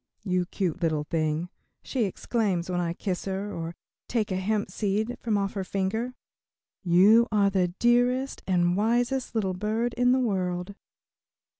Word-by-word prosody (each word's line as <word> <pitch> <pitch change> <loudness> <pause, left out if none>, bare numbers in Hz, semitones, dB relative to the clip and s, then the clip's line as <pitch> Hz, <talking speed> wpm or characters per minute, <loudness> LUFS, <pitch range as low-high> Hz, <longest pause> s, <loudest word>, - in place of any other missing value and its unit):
"You 180 -3 0
cute 185 -2 -2
little 155 -3 +1
thing," 155 +2 -1 0.3
she 250 -5 0
exclaims 190 -3 -1
when 180 - 0
I 170 -1 -1
kiss 180 0 -3
her, 195 +2 -3
or 165 0 -5 0.3
take 220 -3 -1
a - - 0
hemp 205 +2 -1
seed 215 +3 -1
from 220 -3 0
off 195 -1 -1
her 195 - -2
finger, 200 +7 -2 0.7
"you 200 +6 +6
are 200 -2 +3
the 185 -2 +2
dearest 245 +3 +2
and 175 -1 +2
wisest 240 +4 0
little 195 -4 0
bird 220 +5 -1
in 245 0 +3
the 260 - +3
world." 185 -5 -1
200 Hz, 155 wpm, -27 LUFS, 180-230 Hz, 0.7 s, you